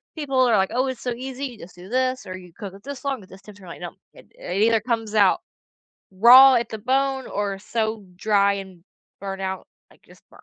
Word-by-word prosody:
people 275 -4 -2
are 235 -4 +4
like, 190 0 +1
"Oh, 255 +2 +1
it's 260 -2 -5
so 250 - -2
easy. 260 +3 -6
You 245 -5 -8
just 180 - -12
do 180 +1 -13
this 255 +1 -1
or 185 0 -7
you 180 -2 -14
cook 200 -4 -7
it 200 - -15
this 280 0 -8
long 265 -7 -2
at - - -18
this 190 +1 -14
temperature." 200 -1 -15
I'm 170 - -9
like, - - -17
"No." 175 - -7 0.2
It - - -17
it 185 +3 -3
either 225 -1 +3
comes 225 -2 -3
out 200 -3 +4 0.7
raw 250 +7 +8
at 235 -1 0
the 220 - -5
bone 265 +3 0
or 200 -1 -3
so 220 0 -3
dry 200 0 +2
and 190 -3 -8 0.4
burnt 195 0 -6
out, 190 0 -4 0.2
like - - -24
just - - -20
burn - - -19
220 Hz, 235 wpm, -23 LUFS, 195-255 Hz, 0.7 s, raw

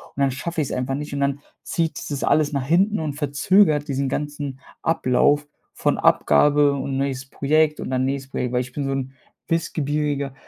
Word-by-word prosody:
und 140 - -3
dann 135 -1 +3
schaffe 160 +5 -3
ich's 145 - -3
einfach 130 +1 -1
nicht 150 +1 -5
und 140 - -2
dann 140 0 0 0.2
zieht 165 -1 -1
sich - - -6
das 145 -2 -3
alles 155 -1 +2
nach 135 -2 -1
hinten 190 +8 +2
und 155 -2 -2
verzögert 150 +2 +2
diesen 135 -1 -1
ganzen 145 -1 -4 0.2
Ablauf 145 -1 +2 0.3
von - - 0
Abgabe 145 - +4
und 135 -1 -3
neues 135 -1 -2
Projekt 150 +2 +1
und - - -5
dann 130 0 +1
nächstes 135 0 -3
Projekt, 125 -1 -2
weil 125 - +2
ich 125 0 -8
bin 145 - -3
so 135 - -1
'n 135 -1 -3 0.4
wissbegieriger, 150 -4 -1
140 Hz, 195 wpm, -22 LUFS, 135-150 Hz, 0.4 s, Abgabe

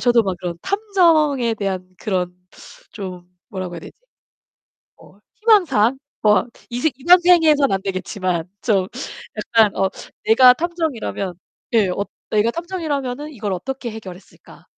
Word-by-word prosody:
저도 240 -2 +4
막 190 -3 -2
그런 175 -1 -4
탐정에 330 - +2
대한 190 -3 -3
그런 180 -3 -2 0.6
좀 185 -4 -7 0.2
뭐라고 185 -2 -5
해야 170 - -7
되지? - - -11 1.0
어, - - -19 0.2
희망 430 -4 +5
사항? 250 -3 +2 0.2
뭐 210 +2 +4 0.2
이 240 +1 -3
새 315 - +2
이번 350 +7 +6
생에서는 320 - +4
안 190 - -2
되겠지만 185 -2 -3
좀 195 -5 +2 0.5
약간 215 0 +3
어, 190 0 +2 0.4
내가 250 +3 +7
탐정이라면 315 - -3 0.4
예, 210 -4 +4
엇 200 +3 -2 0.2
'내가 215 +2 +2
탐정이라면은 305 -6 -4
이걸 210 -7 -4
어떻게 255 +6 -4
해결했을까?' 200 -4 -12
225 Hz, 285 characters per minute, -20 LUFS, 190-300 Hz, 1.0 s, 내가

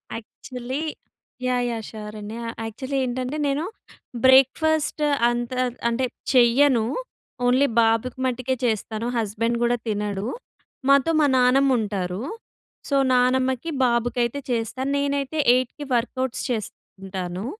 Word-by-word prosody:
Actually 250 +4 -6 0.7
yeah! 250 -1 +1
Yeah! 225 -1 -4
Sure 215 -1 -8
అండి. 210 +2 -7
ఆహ్, 230 - -5
actually 260 +5 -4
ఏంటంటే, 255 +4 -3
నేను 280 +3 0 0.6
బ్రేక్ఫాస్ట్ 295 +4 +4 0.3
అంతా, 240 +1 -2 0.3
అంటే 245 +2 0 0.3
చెయ్యను. 245 -1 +5 0.6
ఓన్లీ 255 +3 +4
బాబుకి 225 +3 +1
మట్టుకే 255 +1 -1
చేస్తాను, 220 0 -1
హస్బెండ్ 230 +2 -1
కూడా 240 0 +2
తినడు. 205 -1 -2 0.6
మాతో 280 +3 +5
మా 300 - +4
నానమ్మ 265 +2 +4
ఉంటారు. 195 -3 -3 0.7
సో, 280 - +1 0.2
నానమ్మకి, 255 +3 +2 0.2
బాబుకి 235 0 0
అయితే 235 +4 -2
చేస్తాను. 240 +3 -2
నేనైతే 280 +1 -1 0.2
8కి 255 +4 -1
వర్కౌట్స్ 250 +1 -1
చేసుకుంటాను. 195 -4 -5
245 Hz, 115 wpm, -23 LUFS, 225-260 Hz, 0.7 s, చెయ్యను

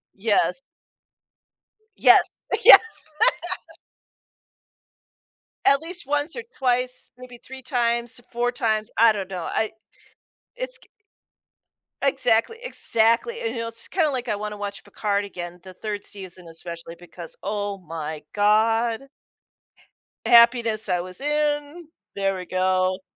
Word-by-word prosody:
Yes. 200 0 +1 1.4
Yes, - - +6 0.4
yes. - - +12 2.9
At 275 0 +6
least 345 -2 -6
once 295 +3 -1
or 470 - -4 0.2
twice, 250 -1 -1
maybe 250 -1 -11
3 265 +2 -11
times, 240 -1 -1
4 245 0 0
times, 220 -3 -1
I 230 0 +7
don't 195 -3 -4
know? 180 -3 -5
I 220 - -1 0.9
it's - - -5
g - - -22 1.2
Exactly, 265 - +2
exactly, 245 - +1
and 455 - -2
you 230 - -3
know, 230 - -3
it's 230 0 -6
kinda 330 -5 +1
like 255 -3 -3
I 210 - 0
wanna 210 0 -5
watch 205 0 -6
Picard 205 -1 -1
again, 175 -3 -7
the 185 - -11
3rd 205 +1 -5
season, 185 -3 -8
especially 165 0 -8
because, 170 -1 -10
oh 205 0 -2
my 160 -3 -6
god. 225 +3 +2 1.2
Happiness 235 -2 +5
I 180 -1 +1
was 185 +3 -7
in. 295 +2 -1 0.3
There 195 -1 0
we 180 -1 -6
go. 185 +1 +1
225 Hz, 120 wpm, -24 LUFS, 190-255 Hz, 2.9 s, yes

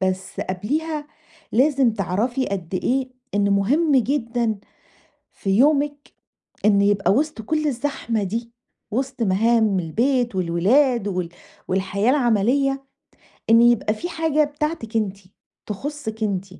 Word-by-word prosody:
بس 190 0 -2
قَبْليها 295 - -3 0.5
لازم 265 0 +3
تِعرفي 220 +6 -1
قد 185 -2 -4
إيه 255 +6 0 0.2
إن 200 0 +2
مهم 275 +11 +2
جدًا 235 -3 0 0.7
في 195 - -6
يومِك 290 +1 +2 0.5
إن 200 -2 +5
يبقى 200 -1 +3
وِسط 290 -1 0
كل 305 +6 -1
الزحمة 240 -5 -2
دي، 230 +4 -4 0.4
وِسط 265 +1 -3
مهام 215 0 +2
البيت 240 - 0
والولاد 205 +7 +2
وال 180 -3 -2 0.4
والحياة 195 +4 0
العملية، 270 +2 +2 0.7
إن 230 +1 +7
يبقى 235 -3 +3
في 350 +11 -5
حاجة 320 -2 +1
بتاعتِك 290 -6 -4
أنتِ، 200 -3 -1 0.5
تخصِك 220 0 -5
أنتِ. 195 -2 -1
230 Hz, 115 wpm, -22 LUFS, 200-275 Hz, 0.7 s, إن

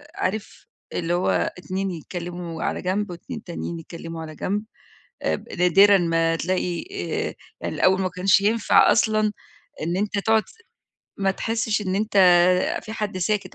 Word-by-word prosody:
عارف 205 +3 -3 0.3
اللي 170 0 -1
هو 180 - +1 0.3
اتنين 190 +2 -3
يتكلموا 175 0 -6
على - - -2
جنب، 195 +2 -1
واتنين 225 +7 -8
تانيين 170 -1 -5
يتكلموا 165 0 -8
على 155 -1 -8
جنب، 205 +6 -2 0.6
ب - - -2
نادرًا 195 +3 +6
ما 165 -2 +1
تلاقي 180 +1 -1
آآ، 395 - -3 0.3
يعني - - -3
الأول 190 +1 +3
ما 185 - 0
كانش 185 +2 +3
ينفع 220 +3 +4
أصلًا 215 -1 +2 0.5
إن 170 +3 -1
أنت 205 +1 -1
تقعد 220 +1 +3 0.8
ما 195 -1 +2
تحسّش 225 +2 -1
إن 185 -2 -2
أنت 215 0 -1 0.7
فيه 220 - -8
حد 205 -4 -3
ساكت 205 +2 -1
185 Hz, 145 wpm, -23 LUFS, 175-210 Hz, 0.8 s, نادرًا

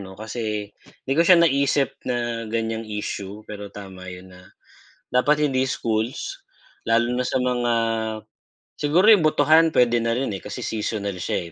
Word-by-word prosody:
'no, 95 -1 -10
kasi 105 -1 -4 0.3
'di 135 - -1
ko 155 - +2
siya 175 +2 +7
naisip 140 -4 +2 0.2
na 120 -2 -2
ganiyang 115 0 -3
issue, 105 0 -5
pero 105 -1 -8
tama 95 -2 -10
yun 90 +1 -10
na 90 0 -16 0.6
dapat 150 +4 +2
hindi 130 0 +1
schools, 115 -3 -3 0.4
lalo 115 +1 +2
na 125 +1 -1
sa 130 - 0
mga 120 -1 0 1.0
siguro 165 +7 +2
yung 210 -6 +7
botohan 160 +1 +4
puwede 120 -4 +3
na 115 - 0
rin, 125 -1 -1
eh, 95 - -7
kasi - - -7
seasonal 105 -2 -3
siya, 85 -1 -3
115 Hz, 155 wpm, -23 LUFS, 105-135 Hz, 1.0 s, siya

